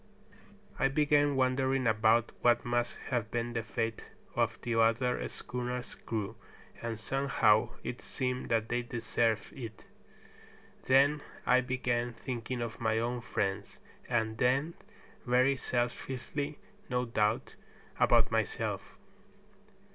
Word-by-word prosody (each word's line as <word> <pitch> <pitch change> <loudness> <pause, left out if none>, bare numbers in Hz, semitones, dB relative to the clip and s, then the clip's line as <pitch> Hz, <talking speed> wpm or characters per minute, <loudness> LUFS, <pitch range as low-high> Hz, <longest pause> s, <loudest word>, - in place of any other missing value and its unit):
I 135 - +4
began 145 0 +3
wondering 130 0 +2
about 110 +1 +3
what 120 0 +4
must 120 0 0
have 120 -3 0
been 120 0 -2
the 115 - 0
fate 115 0 -3 0.3
of - - +1
the 120 - -1
other 115 +2 +2
schooner's 125 0 -4
crew, 110 -1 -4 0.4
and 115 -1 -3
somehow 110 -3 +2
it 125 - -5
seemed 125 -1 -3
that 115 -1 +1
they 120 +1 0
deserved 115 -2 -1
it. 115 -5 -8 1.0
Then 140 +3 +5 0.2
I 130 0 +5
began 120 -2 -1
thinking 120 +1 -4
of 115 -1 -6
my 110 -1 +2
own 120 +2 -1
friends, 100 -4 -2 0.3
and 110 -2 0
then, 135 +7 +2 0.5
very 125 +2 +3
selfishly 130 +4 -3 0.3
no 125 0 0
doubt, 110 -2 0 0.5
about - - +5
myself. - - -2
120 Hz, 115 wpm, -31 LUFS, 115-130 Hz, 1.0 s, Then